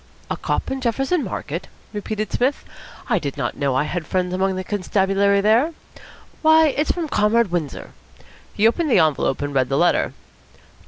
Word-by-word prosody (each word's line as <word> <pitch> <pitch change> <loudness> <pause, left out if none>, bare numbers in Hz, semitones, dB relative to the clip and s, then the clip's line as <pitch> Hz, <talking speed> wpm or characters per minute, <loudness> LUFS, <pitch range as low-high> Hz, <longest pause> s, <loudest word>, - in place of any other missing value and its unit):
"A - - +1
cop - - -2
in 265 0 -3
Jefferson 270 +7 0
Market?" 170 - -5 0.3
repeated 215 +1 -4
Psmith. 260 +4 0 0.4
"I - - +2
did 140 -3 -5
not - - -2
know 140 -2 0
I 130 - +2
had 160 0 -4
friends 180 -1 -1
among 190 +1 0
the 185 - -3
constabulary 200 0 +1
there. 230 +10 +3 0.7
Why, 315 0 +6
it's 295 +2 -1
from 340 -3 -3
Comrade 210 -3 +2
Windsor." 165 -5 -4 0.6
He 215 - +4
opened 310 +7 0
the 245 - +4
envelope 150 -4 +2
and 145 0 -3
read 130 -2 +1
the 135 - +1
letter. 175 +3 +2
200 Hz, 170 wpm, -21 LUFS, 170-245 Hz, 0.7 s, Why